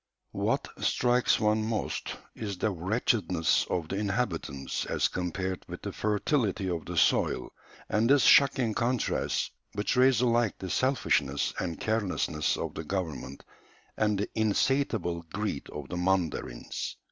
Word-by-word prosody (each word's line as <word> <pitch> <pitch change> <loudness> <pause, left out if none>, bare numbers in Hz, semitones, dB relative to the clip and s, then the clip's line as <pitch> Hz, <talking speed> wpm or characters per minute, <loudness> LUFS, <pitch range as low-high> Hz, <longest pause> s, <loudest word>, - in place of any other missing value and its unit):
] - - -52
What - - 0
strikes 125 0 +2
one 110 0 +2
most 110 0 -2 0.2
is 100 -4 -5
the 105 - 0
wretchedness 95 -2 +1
of 85 -3 -1
the 95 - -2
inhabitants 95 - -2
as - - +1
compared 90 +1 -3
with - - -8
the - - -3
fertility 105 -1 0
of 85 -3 -3
the - - -5
soil, - - +2 0.3
and 110 +3 +2
this 140 -1 +5
shocking 130 -5 +5
contrast 120 +2 0 0.2
betrays 125 +4 +3
alike 120 -3 +2
the 95 -2 -5
selfishness 70 - +1
and 85 -3 -3
carelessness 95 -8 0
of - - -4
the - - -5
government 75 -6 -4 0.5
and 105 -1 +1
the 100 - -2
insatiable 110 -5 +1
greed 105 -7 -3
of 75 -2 -7
the 90 - -4
mandarins. 90 -9 -2
100 Hz, 135 wpm, -29 LUFS, 85-115 Hz, 0.5 s, this